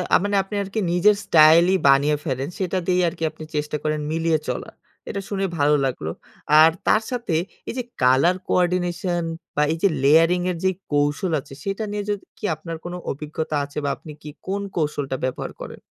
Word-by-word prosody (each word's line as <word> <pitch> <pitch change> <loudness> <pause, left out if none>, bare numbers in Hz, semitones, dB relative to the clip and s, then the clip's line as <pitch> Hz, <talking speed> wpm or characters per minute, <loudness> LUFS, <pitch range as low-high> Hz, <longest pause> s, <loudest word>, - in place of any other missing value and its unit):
আ - - +8
মানে 205 0 0
আপনি 195 +2 -7
আরকি 200 +3 -4
নিজের 180 +4 +4
স্টাইলই 165 +4 +6
বানিয়ে 140 +2 +4
ফেলেন। 135 -1 -2
সেটা 190 -1 -1
দিয়েই 180 0 +3
আরকি 165 0 -4
আপনি - - -11
চেষ্টা 150 0 -1
করেন 155 0 0
মিলিয়ে 165 -1 +1
চলা। - - -3 0.4
এটা 200 - -3
শুনে 195 -1 -1
ভালো 145 0 +4
লাগলো। 80 -11 -3 0.5
আর 160 - +7 0.2
তার 215 - +4
সাথে 235 -9 -2 0.3
এইযে 250 0 -3 0.2
colour 130 +8 +4
coordination 175 0 0 0.3
বা, 150 - +3
এইযে 165 +5 +2 0.2
layering 165 +5 +5
এর 175 - -4
যে 190 - +4 0.2
কৌশল 145 +4 +1
আছে, 135 0 -12
সেটা 195 +2 -3
নিয়ে 205 0 -3
যদি 205 - -3
কি - - -23
আপনার 165 +1 -7
কোনো 175 0 -5
অভিজ্ঞতা 150 +2 -4
আছে? 145 - -13
বা, - - +1
আপনি 155 - -11
কি 150 - -8 0.2
কোন 200 +1 -1 0.2
কৌশলটা 145 -4 -1
ব্যবহার 130 - -3
করেন? - - -8
165 Hz, 180 wpm, -22 LUFS, 150-185 Hz, 0.5 s, আ